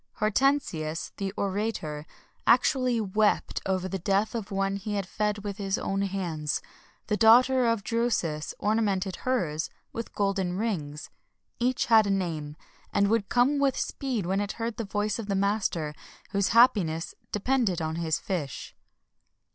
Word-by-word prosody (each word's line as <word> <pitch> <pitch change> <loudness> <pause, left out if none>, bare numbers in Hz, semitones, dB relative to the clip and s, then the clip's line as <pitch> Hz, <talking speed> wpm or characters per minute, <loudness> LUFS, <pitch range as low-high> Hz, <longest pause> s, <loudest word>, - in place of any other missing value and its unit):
Hortensius, 215 - 0
the 195 -1 -2
orator, 190 -7 -2 0.4
actually 255 -4 +4
wept 210 0 +1
over 185 -1 0
the 190 +1 -3
death 195 +4 +1
of 225 -4 -3
the 195 - -6
one 195 0 0
he 205 +1 -4
had 200 -2 -1
fed 210 +2 -2
with 205 -1 -4
his 195 -2 -1
own 195 0 -1
hands; 165 -8 -2 0.5
the 210 - 0
daughter 245 +3 +6
of 230 -3 +1
Drusus 215 -10 -1
ornamented 200 -3 0
hers 170 -12 -1 0.2
with 230 - -6
golden 195 -3 0
rings; 165 -9 -3 0.5
each 250 +1 +1
had 220 -3 +5
a - - -1
name, 165 -6 -2 0.4
and 200 0 +2
would 220 -2 +1
come 260 +4 +3
with 275 -2 +2
speed 250 -9 -2
when 190 +3 0
it 205 0 -3
heard 230 -1 -4
the 230 - -3
voice 205 +2 -1
of 220 - -5
the 200 - 0
master, 195 -6 0 0.4
whose 200 -1 +1
happiness 195 -9 +3 0.2
depended 210 -4 +1
on 160 0 -2
his 160 -2 0
fish. 155 -8 -4
200 Hz, 155 wpm, -27 LUFS, 180-225 Hz, 0.5 s, daughter